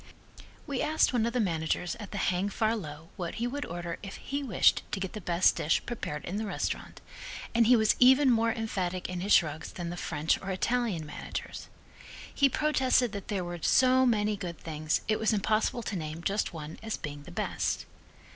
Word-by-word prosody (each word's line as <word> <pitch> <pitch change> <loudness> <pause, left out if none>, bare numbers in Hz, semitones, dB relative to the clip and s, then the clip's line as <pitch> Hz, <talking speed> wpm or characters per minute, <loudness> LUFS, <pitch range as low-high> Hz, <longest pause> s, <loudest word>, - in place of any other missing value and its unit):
We 280 -4 -2
asked 310 -3 +2
one 230 -2 +2
of 235 - -3
the 250 - +1
managers 170 -3 0
at 210 - -7
the 205 - -6
Hang 185 +1 +1
Far 220 +2 +1
Low 165 -5 -7
what 175 -3 -4
he 235 - -2
would 285 +4 -3
order 175 0 -5
if 195 -2 -7
he 280 +1 -4
wished 265 -6 +3
to - - -2
get 190 -1 -4
the 215 - -6
best 175 +1 +3
dish 150 - +2
prepared 150 -11 -5
in 190 - -3
the 220 - -2
restaurant, - - -4 0.5
and 230 -1 +4
he 250 - +7
was 220 -2 +4
even 260 +2 +7
more 230 0 +3
emphatic 185 -6 -2
in 180 -1 -3
his 200 +3 -2
shrugs 155 -1 +3
than 170 -1 -5
the - - -5
French 155 -2 0
or 195 - -6
Italian 200 -3 0
managers. 150 - -6 0.7
He 280 -1 +4
protested 265 -5 +2
that 200 -2 -6
there 200 -4 -1
were 175 0 -5
so 260 +5 +5
many 210 -2 +2
good 175 -4 -6
things 155 -1 -1
it 215 - +1
was 220 0 +2
impossible 215 +3 +1
to 210 - -3
name 160 -1 -5
just 200 +3 0
one 160 -2 -8
as 220 0 -3
being 145 -2 -6
the - - -12
best. - - -2
200 Hz, 205 wpm, -29 LUFS, 170-230 Hz, 0.7 s, he